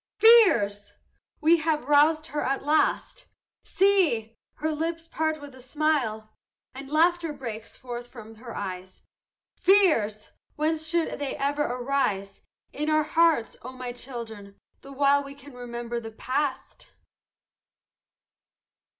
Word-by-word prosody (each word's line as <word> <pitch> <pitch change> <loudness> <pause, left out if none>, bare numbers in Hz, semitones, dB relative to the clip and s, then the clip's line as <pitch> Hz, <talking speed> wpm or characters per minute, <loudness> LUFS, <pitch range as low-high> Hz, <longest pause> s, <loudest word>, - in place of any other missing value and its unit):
"Fears!" 235 - +5 0.5
we 325 +3 +5
have 315 -2 -1
roused 300 +3 +4
her 300 -2 -4
at 270 +1 -1
last; 300 +2 0 0.4
See! 335 - +2 0.2
her 315 +1 -2
lips 330 +2 -3
part 315 -1 -2
with 290 -1 -11
a 260 - -14
smile, 250 -6 -1 0.4
And 270 +1 -9
laughter 335 +2 +2
breaks 230 -6 -7
forth 240 -1 -7
from 225 -3 -12
her 235 +1 -10
eyes, 185 -1 -7 0.6
"Fears! 305 - +3 0.2
whence 315 +1 -1
should 335 -2 -1
they 285 -2 -3
ever 285 +2 -1
arise 245 -7 -1 0.3
In 300 +1 -2
our 310 0 +3
hearts, 320 -6 +2
O 255 +2 -9
my 255 -1 -6
children, 225 -5 -9 0.2
the 275 - -12
while 280 +1 +3
We 280 0 -10
can 285 0 -14
remember 240 -1 -5
the 225 -1 -8
past? 260 +4 -4
275 Hz, 125 wpm, -26 LUFS, 235-310 Hz, 0.6 s, Fears